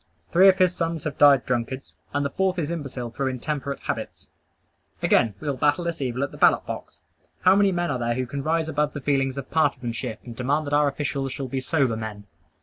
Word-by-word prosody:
Three 185 +3 +7
of 185 - +4
his 185 -1 +4
sons 165 -1 -2
have 150 -3 -4
died 140 -3 +6
drunkards; 125 +2 -3 0.2
and 145 0 0
the 140 - -2
fourth 190 +2 0
is 165 -2 -2
imbecile 135 -7 -5
through 135 +2 -2
intemperate 140 +2 -3
habits. - - -5 0.7
Again, 110 -4 +3
we - - -7
will 140 -2 -1
battle 145 +5 +2
this 170 -2 -3
evil 130 0 -1
at 140 - -3
the - - -12
ballot - - +4
box. - - -7 0.4
How 185 +1 +6
many 200 -1 +4
men 175 -2 -1
are 130 - -2
there 120 0 0
who 130 +1 -1
can 140 +3 -5
rise 160 +2 0
above 150 -1 0
the 145 - -4
feelings 135 -1 0
of 135 -1 -6
partisanship, 125 -8 -1
and 120 -2 -8
demand 140 +6 0
that 145 - -4
our 145 0 +4
officials 140 -2 -2
shall 135 - -4
be 130 +1 -2
sober 130 -3 +1
men? 110 -2 -6
140 Hz, 225 wpm, -24 LUFS, 130-160 Hz, 0.7 s, Three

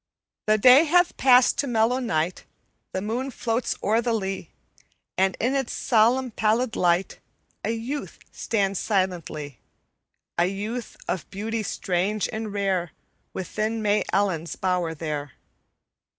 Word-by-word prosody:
"The 215 0 +4
day 255 +8 +7
hath 350 +3 +3
passed 255 -1 +5
to 285 - +1
mellow 235 +1 +2
night, 170 -7 -1 0.5
The 190 - -3
moon 240 +6 -2
floats 235 -1 -1
o'er 220 +3 +3
the 235 0 0
lea, 190 -5 -3 0.7
And 190 0 +1
in 245 +4 +1
its 270 -3 -1
solemn, 240 +2 +2
pallid 225 +3 +1
light 175 +1 +1 0.4
A - - -1
youth 235 +6 -4
stands 195 -4 -1
silently: 170 - -2 0.8
A 175 - +4
youth 215 +5 -5
of 185 - -3
beauty 220 +3 -3
strange 195 +1 -1
and 220 -1 -4
rare, 195 -4 -1 0.4
Within 215 +4 -2
May 210 0 +2
Ellen's 185 -5 0
bower 180 -3 -1
there. 145 -3 -4
210 Hz, 130 wpm, -25 LUFS, 185-235 Hz, 0.8 s, day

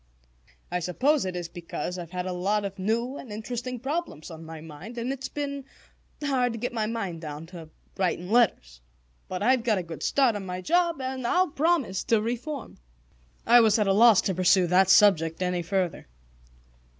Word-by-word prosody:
"I 180 - 0
suppose 255 - +1
it 185 -1 -4
is 175 -1 -4
because 175 +1 -6
I've 170 -2 -7
had 180 0 -4
a 185 - -3
lot 200 +3 0
of 195 0 -6
new 235 +7 -1
and 245 - -10
interesting 245 +3 -5
problems 270 - -4
on 160 0 -9
my 160 0 -9
mind, 160 +9 -10
and 240 +3 -2
it's 270 0 -6
been 280 -1 -4 0.6
hard 255 -4 +1
to - - -5
get 240 +2 -3
my 220 -2 -1
mind 200 -8 -4
down 150 0 -7
to 165 -3 -9 0.3
writing 180 0 -1
letters. 65 - +2 0.5
But 185 +1 -4
I've 255 +2 +3
got 225 -4 +2
a 185 - -2
good 165 -2 -9
start 265 -5 +2
on 205 - -4
my 180 -1 -5
job, 340 - +1
and 260 -1 -3
I'll 365 +6 +2
promise 300 - +1
to 225 - +3
reform." 245 +6 -5 0.7
I 240 +1 +7
was 220 -1 +4
at 210 - +2
a 195 - +3
loss 225 0 +6
to 190 - -1
pursue 185 +1 +4
that 185 +2 +3
subject 165 -6 +5
any 180 -1 -1
further. 180 - -2
210 Hz, 190 wpm, -26 LUFS, 180-250 Hz, 0.7 s, I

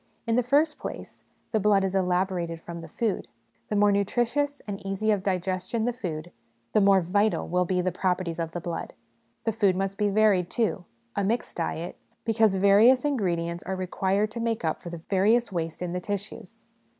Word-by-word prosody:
In 230 -1 +1
the 250 - +4
first 290 +5 +2
place, - - -8 0.3
the 220 - +2
blood 200 -1 +3
is 190 -1 -1
elaborated 180 -2 0
from 170 0 -8
the 165 - -9
food; 215 +5 -2 0.4
the 210 - -2
more 205 0 +5
nutritious 240 +8 0
and 200 -2 -6
easy 195 +3 0
of 205 -2 +1
digestion 185 +3 -1
the 245 - 0
food, 175 -7 -5 0.4
the 215 - +4
more 195 -1 +5
vital 205 +5 +1
will 180 +1 +1
be 180 +1 +1
the 185 +1 0
properties 180 -2 -1
of 165 -1 -2
the 175 - -4
blood. 170 0 -5 0.5
The 225 - +1
food 205 -4 +2
must 195 +1 -2
be 210 -1 +2
varied, 200 -4 +3
too, 215 -6 -1 0.3
a 200 - 0
mixed 225 +5 -1
diet, 170 0 -3 0.3
because 220 -3 +3
various 205 +8 +5
ingredients 175 -10 -1
are 190 - -4
required 190 +3 0
to 235 - -5
make 230 -5 -1
up 160 - -1
for 175 - -7
the 170 -1 -8
various 215 +4 +3
waste 165 -1 -3
in 175 -1 -3
the 180 - -1
tissues. 205 +2 -6
195 Hz, 190 wpm, -27 LUFS, 180-220 Hz, 0.5 s, more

